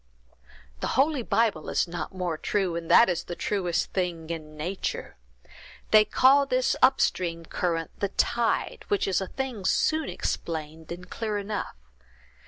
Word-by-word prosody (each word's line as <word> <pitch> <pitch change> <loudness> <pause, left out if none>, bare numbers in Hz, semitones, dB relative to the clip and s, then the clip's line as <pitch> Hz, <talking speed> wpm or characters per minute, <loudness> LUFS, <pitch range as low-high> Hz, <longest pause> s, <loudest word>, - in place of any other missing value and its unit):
"The - - -2
holy 280 0 +3
Bible 220 -8 +1
is - - +1
not 175 0 -5
more 180 -3 -2
true, 185 +2 -1
and 170 -1 -5
that 235 - +7
is 175 -2 -1
the 175 - -5
truest 180 -4 -1
thing 170 -3 -2
in 155 -2 -7
nature. 180 +6 -4 0.8
They 215 -1 +7
call 275 +6 +5
this 255 0 +1
up 260 +1 +5
stream 170 -2 0
current 165 -1 -2
the 200 - 0
tide, 235 +3 0
which 405 - +1
is 195 0 +1
a 190 - -3
thing 255 -5 -4
soon 315 +10 +1
explained, 160 -1 -4
and 180 +1 -7
clear 215 +1 -3
enough. 205 +1 -4
185 Hz, 155 wpm, -27 LUFS, 170-230 Hz, 0.8 s, that